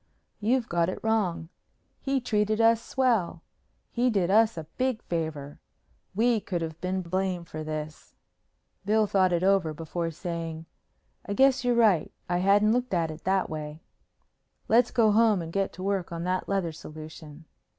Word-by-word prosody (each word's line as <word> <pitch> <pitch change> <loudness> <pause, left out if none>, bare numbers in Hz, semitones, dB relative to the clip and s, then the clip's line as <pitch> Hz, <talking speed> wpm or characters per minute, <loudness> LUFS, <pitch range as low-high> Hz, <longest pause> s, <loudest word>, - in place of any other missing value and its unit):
"You've 235 +3 +1
got 170 0 +1
it - - -4
wrong. 200 -7 0 0.5
He 270 -1 0
treated 215 -2 0
us 230 0 +4
swell. 230 -10 0 0.5
He 250 +1 +1
did 190 -5 +1
us 220 -1 +4
a 160 - -4 0.2
big 255 -3 +1
favor. 155 -4 -4 0.6
We 230 +1 +3
could 175 -4 -3
have 160 0 -7
been 185 +1 -2
blamed 180 0 -2
for 155 0 -6
this." 155 0 -6 0.7
Bill 215 +2 +3
thought 190 -2 +2
it 175 0 +1
over 190 -5 +2
before 165 +2 -3
saying, 165 -1 -5 0.6
"I 200 - -2
guess 265 +1 +4
you're 245 -1 +2
right. 215 -8 +3 0.2
I 175 0 0
hadn't 205 +3 +4
looked 250 -4 -1
at 165 -2 0
it 155 - -11
that 190 0 +1
way." 155 0 -7 0.8
"Let's 235 +2 +4
go 220 -3 +3
home 220 -2 +4
and 165 -1 -6
get 195 -1 0
to 185 - -8
work 195 -3 -1
on 170 0 -4
the 185 +1 0
leather 195 -4 -1
solution." 155 0 -11
185 Hz, 165 wpm, -27 LUFS, 165-220 Hz, 0.8 s, us